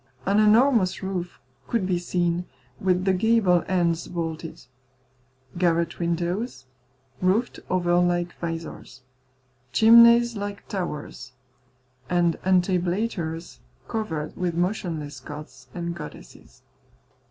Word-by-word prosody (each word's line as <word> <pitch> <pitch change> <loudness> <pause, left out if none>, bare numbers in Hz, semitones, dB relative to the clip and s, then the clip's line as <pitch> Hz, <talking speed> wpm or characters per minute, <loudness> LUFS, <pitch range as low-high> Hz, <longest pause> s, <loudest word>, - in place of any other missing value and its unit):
An 200 +2 +3
enormous 215 -2 +4
roof 180 -2 -4 0.3
could 230 -5 0
be 180 -2 0
seen, 175 0 -1 0.3
with 185 -1 +1
the 190 - +3
gable 190 -3 +3
ends 175 -3 0
vaulted; 165 -4 -5 0.9
garret 170 -1 +1
windows, 170 - -2 0.6
roofed 195 +7 +1
over 175 -1 +1
like 175 0 +1
visors; 165 -5 -6 0.7
chimneys 235 +1 +7
like 200 -1 -6
towers; 150 -8 -5 0.8
and 175 -2 +2
entablatures 180 -2 0 0.3
covered 160 -10 -3
with 180 -2 -2
motionless 170 -5 -2
gods 145 -3 -10
and 170 -1 -3
goddesses. 150 - -12
175 Hz, 95 wpm, -25 LUFS, 170-195 Hz, 0.9 s, chimneys